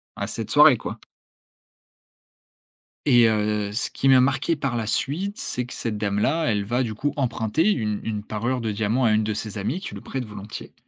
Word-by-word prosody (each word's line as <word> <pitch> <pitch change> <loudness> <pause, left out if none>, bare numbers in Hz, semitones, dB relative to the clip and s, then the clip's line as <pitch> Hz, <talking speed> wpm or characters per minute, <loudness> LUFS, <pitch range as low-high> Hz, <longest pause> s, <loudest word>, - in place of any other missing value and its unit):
à - - -9
à - - 0
à - - -2
cette - - -5
soirée - - +7
quoi. - - -6 2.1
Et 120 -4 +6
heu, 105 -1 0
ce 110 - -1
qui 135 - 0
m'a 130 -1 +7
marqué 135 +5 +1
par 135 -4 -2
la 110 -2 -2
suite, 185 - -2
c'est 125 - -2
que 120 - -10
cette 110 -3 -3
dame 105 -1 -1
là 160 +9 +1
elle 105 -5 +1
va 120 +5 0
du 110 -3 -3
coup 145 +6 -2
emprunter 130 - +1
une 105 - -1
une 105 -2 -3
parure 120 +4 -2
de 110 -2 -2
diamants 110 +5 0
à 110 - +4
une 110 0 +2
de 110 - -1
ses 105 0 -5
amies 125 - -2
qui - - -7
lui - - -8
prête 130 -3 -4
volontiers. 105 0 -9
115 Hz, 215 wpm, -24 LUFS, 105-130 Hz, 2.1 s, soirée